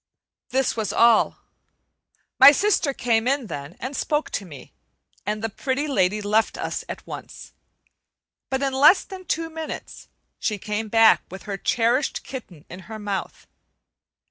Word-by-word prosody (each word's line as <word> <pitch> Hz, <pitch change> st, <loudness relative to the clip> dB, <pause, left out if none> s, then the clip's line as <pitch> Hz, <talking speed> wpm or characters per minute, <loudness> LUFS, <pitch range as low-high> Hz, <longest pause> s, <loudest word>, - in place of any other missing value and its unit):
This 265 Hz, 0 st, 0 dB
was 220 Hz, -2 st, -2 dB
all. 230 Hz, -1 st, +4 dB, 1.0 s
My 280 Hz, -, +11 dB
sister 380 Hz, -2 st, +1 dB
came 235 Hz, -3 st, 0 dB
in 275 Hz, -1 st, +1 dB
then 145 Hz, -3 st, -7 dB
and 265 Hz, +3 st, -5 dB
spoke 300 Hz, +2 st, -1 dB
to 200 Hz, -, -3 dB
me, 140 Hz, -6 st, -12 dB, 0.5 s
and 210 Hz, +1 st, -2 dB
the -, -, +1 dB
Pretty 265 Hz, +7 st, -2 dB
Lady 210 Hz, -6 st, +1 dB
left 215 Hz, +2 st, +1 dB
us -, -, -3 dB
at -, -, -7 dB
once; -, -, -9 dB, 1.0 s
but 265 Hz, 0 st, -1 dB
in 270 Hz, -1 st, 0 dB
less 295 Hz, +8 st, +6 dB
than 375 Hz, -1 st, -10 dB
two 330 Hz, 0 st, -1 dB
minutes 320 Hz, -1 st, -8 dB, 0.3 s
she 210 Hz, -, -1 dB
came 210 Hz, +2 st, -3 dB
back 225 Hz, +1 st, +5 dB
with 190 Hz, 0 st, -9 dB
her 205 Hz, -2 st, -4 dB
cherished 235 Hz, +7 st, 0 dB
kitten 185 Hz, -, -9 dB
in 180 Hz, -, -10 dB
her 220 Hz, -, -6 dB
mouth. 205 Hz, -2 st, -5 dB
230 Hz, 150 wpm, -23 LUFS, 210-275 Hz, 1.0 s, My